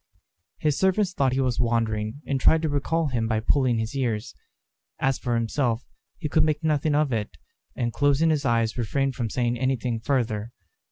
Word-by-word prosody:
His 150 -2 0
servants 190 0 +2
thought 135 -6 +1
he 130 - 0
was 125 -3 0
wandering, 115 +1 0
and 135 -1 -1
tried 160 +4 +4
to 160 - +1
recall 150 +2 0
him 115 -4 -1
by 110 -1 +1
pulling 125 +1 +2
his 110 +4 -3
ears. 115 -6 -2 0.6
As 135 -1 0
for 120 -1 -1
himself, 115 +1 0 0.3
he 160 - -3
could 155 +1 +3
make 155 -1 0
nothing 150 -1 +1
of 150 -3 +2
it, 105 -2 -3 0.4
and 120 -1 -2
closing 145 +3 +3
his 150 -2 0
eyes 115 -2 +1
refrained 135 +4 0
from 120 -2 -3
saying 120 +1 -1
anything 125 -3 -1
further. 115 -3 -1
130 Hz, 180 wpm, -25 LUFS, 115-145 Hz, 0.6 s, tried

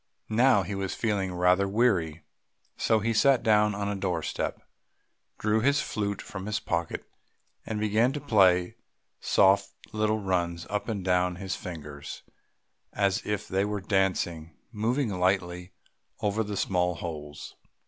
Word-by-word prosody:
Now 115 -2 +4
he 95 - -5
was 95 -1 -3
feeling 100 -4 -1
rather 90 +2 +3
weary, 95 -8 +1 0.5
so 110 -1 +2
he 115 +2 0
sat 135 +3 +4
down 105 -2 +3
on 100 0 -2
a 100 - -1
doorstep, 90 -5 -2 0.8
drew 110 +1 +1
his 140 +4 +3
flute 100 -2 -3
from 95 -1 -7
his 105 0 -1
pocket, 85 -1 -3 0.6
and 110 -1 -2
began 110 +4 +2
to 145 - -3
play 95 -9 +3 0.4
soft 100 0 +3 0.2
little 110 0 +1
runs 85 -4 -1
up 105 +3 -2
and 100 -4 -3
down; 90 -1 +2
his 95 +1 -4
fingers, 75 -5 -8 0.7
as 100 -2 0
if 105 -2 -2
they 95 +1 +1
were 105 0 -2
dancing, 90 -5 -1
moving 115 +4 0
lightly 90 -1 -1 0.5
over 105 +2 0
the 105 -1 -5
small 90 -2 +1
holes. 75 -3 -7
100 Hz, 140 wpm, -28 LUFS, 90-105 Hz, 0.8 s, Now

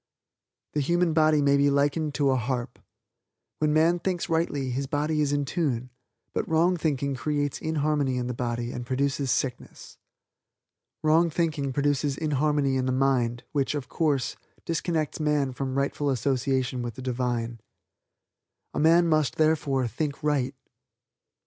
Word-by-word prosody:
The 150 - 0
human 170 +3 +2
body 155 -2 +4
may 140 0 +4
be 140 0 +4
likened 145 +2 +1
to 140 -3 +2
a - - +2
harp. 125 0 -3 0.8
When 150 -1 +2
man 165 +3 +3
thinks 180 0 -2
rightly 145 -5 0
his 135 +2 -2
body 150 +2 0
is 145 -1 +1
in 145 0 0
tune; 130 -6 -2 0.4
but - - -2
wrong 165 +3 +3
thinking 140 -4 -1
creates 145 +2 -2
inharmony 150 -4 0
in 125 - -1
the 125 - -3
body 120 0 -3
and 125 - -5
produces 135 +2 -1
sickness. 125 0 -3 1.0
Wrong 160 +2 +4
thinking 155 -4 -1
produces 145 0 0
inharmony 145 -2 +1
in 130 0 0
the - - +1
mind, 125 -3 +1
which, 140 0 0
of 140 -4 -4
course, 145 -6 0 0.3
disconnects 165 -2 -1
man 150 -3 +1
from 130 +1 -3
rightful 140 +1 0
association 130 0 0
with 120 -2 -5
the 130 - -8
Divine. 120 -2 -2 1.1
A - - -2
man 170 +2 +5
must, 155 -6 +2
therefore, 150 -5 +1
think 145 +4 -4
right. 140 -3 0
140 Hz, 150 wpm, -26 LUFS, 130-155 Hz, 1.1 s, man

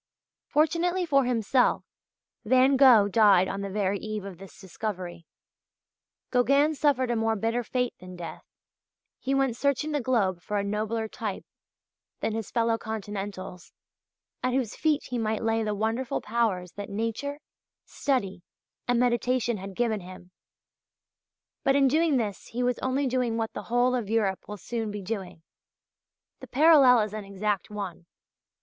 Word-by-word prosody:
Fortunately 345 +4 +1
for 275 -5 +3
himself 245 +1 +2 0.6
Van 260 +4 +4
Gogh 250 -7 +7
died 200 -3 +5
on 195 - -4
the 200 - -4
very 200 0 -1
eve 215 -1 -5
of 190 -3 -9
this 195 -1 -13
discovery. 185 -4 -6 1.0
Gauguin 275 +5 +3
suffered 270 -4 +1
a - - +1
more 225 0 +1
bitter 225 +3 0
fate 250 +1 -1
than 185 0 -10
death; 170 -2 -8 0.8
he 270 +1 -1
went 270 -3 +1
searching 280 +4 0
the 295 -2 0
globe 205 -8 +1
for 210 +4 -3
a 200 - 0
nobler 215 +2 -2
type 215 -3 -5 0.7
than 220 - -1
his 225 -2 -4
fellow 230 -1 +1
continentals, 205 -4 -6 0.7
at 255 0 0
whose 250 -5 -1
feet 310 -2 +1
he 245 -1 -4
might 220 -1 -1
lay 225 0 +1
the 210 -1 -1
wonderful 225 +5 -1
powers 210 -6 -1
that 205 -1 -7
nature, 230 +8 -3 0.5
study, 220 -10 -1 0.5
and 245 -1 +2
meditation 245 -1 +1
had 195 0 -8
given 225 -2 0
him. 185 0 -12 1.3
But 270 - +3
in 275 -1 +5
doing 310 +1 +3
this 210 -5 -3
he 245 +2 -3
was 250 0 0
only 260 +2 0
doing 250 -3 0
what 225 -1 -2
the - - -5
whole 245 +1 +3
of 235 -5 -2
Europe 210 -4 0
will 210 - -6
soon 225 +2 -4
be 205 -1 -6
doing. 190 -5 -5 1.0
The - - -10
parallel 275 -4 +6
is 210 -1 -3
an 215 -1 -5
exact 200 -1 -2
one. 195 -5 -6
225 Hz, 155 wpm, -27 LUFS, 200-255 Hz, 1.3 s, Gogh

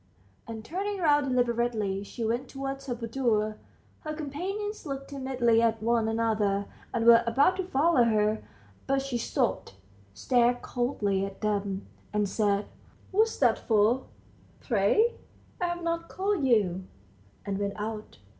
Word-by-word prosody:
And, 225 -1 -7
turning 395 - -3
round 295 -5 +3
deliberately, 235 -5 0
she 230 +3 -5
went 240 +4 -1
towards 270 0 -5
her 245 - -2
boudoir. 230 -3 0 0.4
Her 310 -1 -5
companions 380 +9 -4
looked 275 -2 -6
timidly 255 -4 +2
at 225 -1 +2
one 230 +1 +1
another, 215 -3 +1 0.3
and 230 -1 -1
were 235 0 +8
about 285 +10 +3
to 375 - -2
follow 280 -5 +3
her, 215 -1 +2 0.5
but 270 0 +1
she 260 -3 -2
stopped, 240 - -1 0.4
stared 245 - +2
coldly 210 -6 -1
at 195 0 -6
them, 200 -2 -1 0.3
and 210 -1 +1
said, 200 0 +1 0.5
"What's 435 +3 +2
that 245 -5 +3
for, 220 +4 +2 0.5
pray? 255 - +2 0.4
I've 345 -1 -1
not 335 0 -2
called 380 -7 0
you," 190 -6 +2 0.6
and 200 -1 -2
went 200 0 -1
out. 215 0 -5
235 Hz, 135 wpm, -28 LUFS, 215-280 Hz, 0.6 s, were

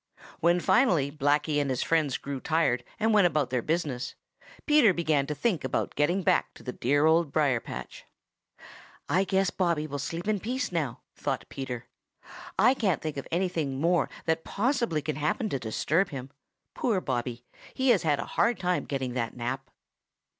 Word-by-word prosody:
When 170 +2 +3
finally 180 - +3
Blacky 145 +1 +1
and 140 - -1
his 130 -2 0
friends 155 -5 +1
grew 140 -1 -5
tired 155 -6 +1 0.2
and 220 0 +2
went 205 -4 +6
about 150 -6 0
their 125 -2 +1
business, 150 -4 -2 0.5
Peter 295 - +5
began 155 -5 +1
to 150 - -3
think 190 - 0
of 130 - -1
getting 175 +6 +1
back - - +2
to - - -14
the 125 - -4
dear 145 +5 +1
Old 160 -1 +3
Briar 140 -5 +2
patch. - - -8 1.0
"I 185 +3 +3
guess 190 0 +1
Bobby 170 -5 0
will 145 -2 -5
sleep 165 +7 -4
in 215 -2 +1
peace 250 +3 -2
now," 150 -8 -2
thought 135 -5 -3
Peter. 125 -3 -5 0.7
"I 250 +3 +6
can't 200 - 0
think 155 -2 -3
of 140 - -5
anything 165 -6 -1
more 170 +2 +2 0.2
that 160 0 0
possibly 235 - 0
can 155 -3 -3
happen 155 - 0
to 135 - -2
disturb 155 - 0
him. 135 -1 -7 0.4
Poor 220 -6 +1
Bobby. 120 -5 -3 0.3
He 265 0 +1
has 225 -7 +5
had 150 -3 +2
a - - -3
hard 235 0 +1
time 180 -1 0
getting 130 -3 -3
that 120 -1 -3
nap." 130 +2 -4
155 Hz, 175 wpm, -28 LUFS, 135-185 Hz, 1.0 s, went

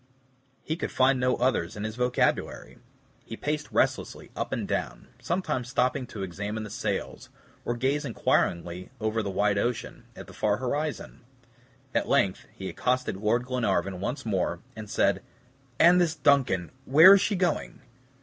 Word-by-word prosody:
He 160 - -2
could - - -3
find 130 0 +3
no 125 0 +2
others 125 -9 0
in 105 - -5
his 110 0 -4
vocabulary. 125 0 -1 0.4
He 115 - -8
paced 150 0 -3
restlessly - - -1
up - - -3
and - - -2
down; - - -3
sometimes 170 -9 -2
stopping 125 0 0
to 100 -4 -6
examine 105 +4 -4
the 105 - -8
sails, - - -4 0.4
or 120 - -1
gaze 135 +5 0
inquiringly 90 - 0
over 110 +1 0
the 100 - -3
wide 100 +1 +1
ocean, 120 +2 -3
at - - -9
the - - -14
far 105 -1 +1
horizon. 145 +4 -3 0.7
At - - 0
length - - +1
he - - -7
accosted 125 -4 -1
Lord 110 +4 +1
Glenarvan 100 -7 -1
once 120 +9 -4
more, 90 -5 -1 0.2
and 110 -2 -8
said - - +2 0.6
"And 175 +2 +7
this 165 -2 +1
DUNCAN 125 -11 +2
where 160 +8 +9
is 200 - +5
she 205 - +1
going?" 180 -7 -1
120 Hz, 160 wpm, -27 LUFS, 105-140 Hz, 0.7 s, where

